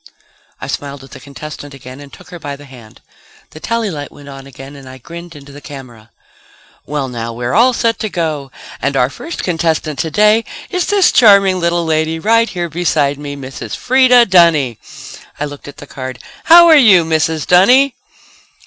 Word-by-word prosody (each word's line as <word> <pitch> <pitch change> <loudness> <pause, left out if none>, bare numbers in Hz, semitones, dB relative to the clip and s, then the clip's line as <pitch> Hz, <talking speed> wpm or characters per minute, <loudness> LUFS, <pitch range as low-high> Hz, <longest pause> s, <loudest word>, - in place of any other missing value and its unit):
I - - -7
smiled 140 -1 -6
at 135 - -16
the - - -11
contestant 145 0 -10
again 130 0 -12
and 145 -1 -13
took - - -16
her 175 - -9
by 145 -2 -6
the 145 +1 -14
hand. 120 -5 -16 0.5
The 155 - -12
tally 230 +3 -2
light 145 -3 -7
went 145 -1 -14
on 135 0 -11
again 135 +1 -12
and 135 -2 -12
I 130 - -11
grinned 170 +5 -11
into 140 -1 -13
the 145 +1 -12
camera. 125 -7 -12 0.8
"Well, 145 -2 -3
now, 115 -2 -6
we're 120 +1 -4
all 235 +7 +4
set 230 -1 -1
to 215 - -3
go... 155 -7 -4 0.3
and 140 0 -1
our 125 +1 +1
first 330 - -7
contestant 160 -4 -2
today 210 +7 +2 0.3
is 365 -2 -1
this 400 -2 +3
charming 200 -6 +5
little 170 0 0
lady 160 0 -1
right 230 +6 +2
here 175 -2 -4
beside 150 -4 -1
me. 145 -1 -7
Mrs. 135 -1 -8
Freda 250 -1 +4
Dunny." 165 - +3 0.6
I 150 - -2
looked 145 -1 -10
at 145 - -11
the - - -11
card. 130 -2 -8 0.3
"How 340 +1 +8
are 325 - +7
you, 205 - +5
Mrs. 160 -1 -1
Dunny?" 250 +10 +4
155 Hz, 185 wpm, -15 LUFS, 140-195 Hz, 0.8 s, How